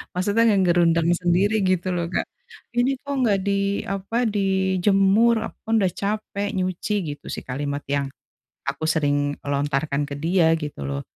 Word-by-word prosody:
Maksudnya 205 +5 +2
ngegerundeng 175 -3 +3
sendiri 190 +5 +2
gitu 185 0 +1
loh, 170 -1 -1
Kak. 180 - -1 0.5
"Ini 255 +2 +1
kok 285 - -3
nggak 205 -5 +2
di 200 0 0
apa, 195 +3 -3
dijemur? 195 +2 +3
Aku - - -16
kan 225 - 0
udah 185 -3 +2
capek 205 0 -2
nyuci!" 185 +3 -1 0.2
Gitu - - -29
sih, - - -5
kalimat 145 +2 -3
yang 140 0 -1 0.6
aku 140 +3 -3
sering 145 -2 +1
lontarkan 145 0 -1
ke 140 - -5
dia, 165 +1 +3
gitu 150 - -6
loh. 70 0 -3
180 Hz, 150 wpm, -23 LUFS, 145-200 Hz, 0.6 s, ngegerundeng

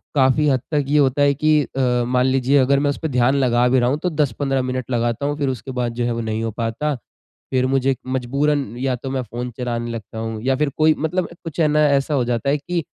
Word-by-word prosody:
काफ़ी 135 +2 +3
हद 130 -3 +1
तक 145 -2 +1
ये 150 - +3
होता 140 0 +2
है 140 0 +4
कि 155 +2 +3
अ, 125 -3 0
मान 125 0 +2
लीजिए 130 +1 +2
अगर 135 +1 +3
मैं 145 0 +1
उसपे 160 +3 -2
ध्यान 125 0 +2
लगा 125 -3 +3
भी 130 +1 +3
रहा 120 0 +2
हूँ 140 - 0
तो 180 - +1
10-15 140 -3 0
मिनट 130 0 -4
लगाता 120 +2 0
हूँ 145 0 -1
फिर 140 -3 0
उसके 130 +1 -5
बाद 120 -1 -2
जो 120 0 -2
है 120 - 0
वो 115 - -3
नहीं 110 0 -2
हो 115 - -2
पाता। 115 +7 -2 0.6
फिर 130 -1 +2
मुझे 135 0 +1
मजबूरन 140 +3 0
या 130 0 -1
तो 130 +2 -7
मैं 135 -1 -1
फ़ोन 120 +1 -6
चलाने 120 -2 -3
लगता 110 -1 -7
हूँ 110 -1 -4
या 130 +1 +2
फिर 150 0 +1
कोई 155 0 +5
मतलब 175 +4 -1 0.2
कुछ 165 -1 -7
है 160 - +4
न 150 - 0
ऐसा 145 -1 +2
हो 135 - +2
जाता 120 +3 -1
है 145 - +2
कि 170 +4 -3
130 Hz, 250 wpm, -21 LUFS, 120-145 Hz, 0.6 s, कोई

